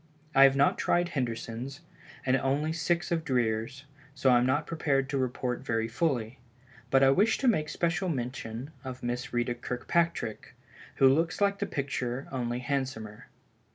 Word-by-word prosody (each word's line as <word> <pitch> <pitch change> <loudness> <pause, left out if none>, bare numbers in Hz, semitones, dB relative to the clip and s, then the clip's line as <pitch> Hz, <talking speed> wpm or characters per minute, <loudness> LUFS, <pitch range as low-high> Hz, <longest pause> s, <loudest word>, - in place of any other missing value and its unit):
I 135 0 +8
have 135 0 +4
not 140 +1 +3
tried 175 0 +2
Henderson's, 120 0 -4 0.4
and 130 0 +3
only 140 +4 0
six 170 +3 -1
of 165 -2 0
Dreer's, 125 -1 -1 0.3
so 135 -1 +3
I 120 - +6
am 125 - +2
not 145 +4 +1
prepared 140 -5 0
to 140 - -1
report 125 -1 -2
very 115 -3 0
fully. 120 -3 -1 0.5
But 135 0 +4
I 135 - +6
wish 210 +10 +3
to 265 - 0
make 155 -10 +2
special 175 +2 0
mention 125 -1 -4
of 130 -1 -7
Miss 120 +3 -3
Ritta 120 0 0
Kirkpatrick, 125 0 -2 0.4
which 135 - +6
looks 165 +4 +1
like 200 -1 +2
the - - -1
picture 135 -2 -3
only 120 -2 -2
it - - -5
is - - -11
handsomer. 130 -7 -3
135 Hz, 170 wpm, -29 LUFS, 120-155 Hz, 0.5 s, I